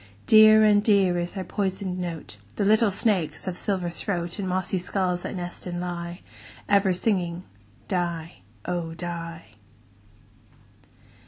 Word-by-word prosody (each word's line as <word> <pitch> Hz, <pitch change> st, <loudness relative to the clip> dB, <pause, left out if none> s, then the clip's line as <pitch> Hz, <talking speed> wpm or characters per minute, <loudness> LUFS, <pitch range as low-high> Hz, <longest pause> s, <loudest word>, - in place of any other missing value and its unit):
Dear 215 Hz, 0 st, +8 dB
and 210 Hz, -1 st, +5 dB
dear 195 Hz, -5 st, +3 dB
is 175 Hz, 0 st, -3 dB
their 190 Hz, -1 st, -4 dB
poisoned 190 Hz, -1 st, -3 dB
note, 165 Hz, -11 st, -6 dB, 0.2 s
The 205 Hz, -, 0 dB
little 215 Hz, +1 st, +4 dB
snakes' 195 Hz, -4 st, 0 dB
of 185 Hz, -, -2 dB
silver 180 Hz, -3 st, -2 dB
throat, 175 Hz, 0 st, -3 dB
In 195 Hz, -, -2 dB
mossy 185 Hz, 0 st, -1 dB
skulls 180 Hz, 0 st, -1 dB
that -, -, -5 dB
nest 175 Hz, 0 st, -6 dB
and 175 Hz, 0 st, -4 dB
lie, 175 Hz, -1 st, -5 dB, 0.5 s
Ever 200 Hz, -1 st, +3 dB
singing 180 Hz, -2 st, 0 dB, 0.4 s
"die, 170 Hz, -, -3 dB, 0.2 s
oh! 170 Hz, -2 st, -3 dB
die." 165 Hz, -9 st, -7 dB
180 Hz, 135 wpm, -25 LUFS, 175-200 Hz, 0.5 s, Dear